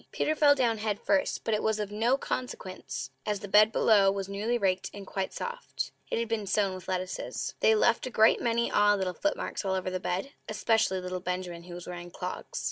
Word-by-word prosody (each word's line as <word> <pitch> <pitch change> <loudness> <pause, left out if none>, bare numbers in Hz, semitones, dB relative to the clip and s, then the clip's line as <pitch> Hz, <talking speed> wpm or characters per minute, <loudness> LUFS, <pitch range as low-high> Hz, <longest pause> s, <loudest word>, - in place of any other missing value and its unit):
Peter 310 - 0
fell 290 -1 +6
down 235 -5 +1
head 210 -1 -1
first; 285 -1 +1
but 225 - 0
it 215 - +1
was 220 -1 0
of 205 -1 -3
no 230 +5 +2
consequence, 185 - -5
as 210 -1 -2
the 205 - -6
bed 210 +2 +6
below 205 -4 +5
was 195 -1 -2
newly 210 +5 -1
raked 190 -4 0
and 200 -1 -8
quite 190 0 -3
soft. 485 +1 -5 0.2
It - - -1
had 230 0 -1
been 220 -2 -2
sown 195 -1 +1
with 185 -1 -9
lettuces. 185 0 -3
They 220 - +5
left 230 +3 +2
a - - -3
great 220 -2 +4
many 235 0 +1
odd 205 0 +4
little 185 -2 -1
footmarks 300 +2 -2
all 190 -1 0
over 185 0 -2
the 185 - -2
bed, 185 +9 -2 0.2
especially 215 -3 +2
little 185 0 -4
Benjamin, 180 -1 -4
who 175 -1 -8
was 175 - -8
wearing 175 0 -7
clogs. 180 - -5
205 Hz, 215 wpm, -29 LUFS, 185-225 Hz, 0.2 s, fell